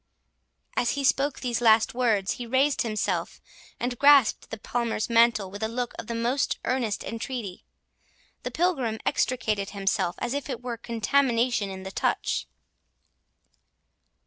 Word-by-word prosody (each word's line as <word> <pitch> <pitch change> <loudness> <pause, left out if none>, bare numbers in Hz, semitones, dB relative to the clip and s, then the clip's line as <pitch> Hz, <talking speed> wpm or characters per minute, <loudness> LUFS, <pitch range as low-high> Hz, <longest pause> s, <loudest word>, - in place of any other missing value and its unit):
As 240 - +1
he 280 - -1
spoke 275 +1 +1
these 240 -2 -1
last 220 -1 +4
words, 225 -6 +1
he 245 - -5
raised 270 +4 +2
himself, 215 -2 -2 0.4
and 245 0 -3
grasped 280 -5 +5
the 225 - -5
Palmer's 235 0 -2
mantle 230 -4 +4
with 205 +2 -8
a 220 - 0
look 240 +1 -3
of 230 - -7
the 235 - -3
most 240 +4 0
earnest 245 -5 -1
entreaty. 230 -4 -5 0.8
The - - -4
pilgrim 275 -11 0
extricated 215 -6 0
himself, 195 -3 -1
as 240 - -3
if 285 -1 -3
there 260 -4 -4
were 245 0 -5
contamination 235 -1 +1
in 190 0 -7
the 190 - -6
touch. - - -1
235 Hz, 145 wpm, -26 LUFS, 215-255 Hz, 0.8 s, grasped